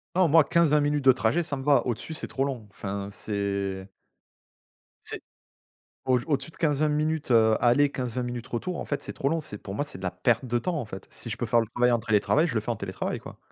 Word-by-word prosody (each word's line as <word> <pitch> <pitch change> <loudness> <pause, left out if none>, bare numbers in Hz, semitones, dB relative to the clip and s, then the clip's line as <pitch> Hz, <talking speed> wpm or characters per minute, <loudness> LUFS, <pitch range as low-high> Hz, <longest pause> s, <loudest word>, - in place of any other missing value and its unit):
Nan, 185 -1 +5
moi 160 +1 +7
15-20 150 -3 +3
minutes 145 0 +1
de 130 - +9
trajet 130 +7 +1
ça 150 -3 -4
me 135 - -6
va, 140 -3 +4
au-dessus, 120 +6 -3
c'est - - -4
trop 135 - -1
long 130 -6 -3
enfin 100 0 -5
c'est 100 -2 -2 1.2
c'est, - - -4 0.8
au-d 125 -2 +2
au-dessus 140 0 -1
de - - -19
15-20 150 -1 +2
minutes, 150 -2 0
heu, 110 -1 +5
aller 125 +4 +4
15-20 125 -2 -3
minutes 120 0 -5
retour 170 +9 -3
en - - -4
fait 145 - -2
c'est - - -6
trop 140 - -1
long 165 +2 +1
c'est 120 -9 -7
pour 95 - -8
moi 130 - 0
c'est 145 - -9
de 95 - -11
la 90 - -1
perte 90 +8 +1
de 120 -1 0
temps 175 +5 -2
en 125 - -4
fait. 95 -2 -9
Si 115 - -5
je 115 - -4
peux 120 - -2
faire 120 +1 +3
le 115 - -4
travail 120 +2 +2
en 120 - +3
télétravail, 110 +9 +2
je 140 - -4
le 110 - +2
fais 110 - -6
en - - -2
télétravail 95 -3 -4
quoi. - - -11
125 Hz, 250 wpm, -27 LUFS, 110-150 Hz, 1.2 s, de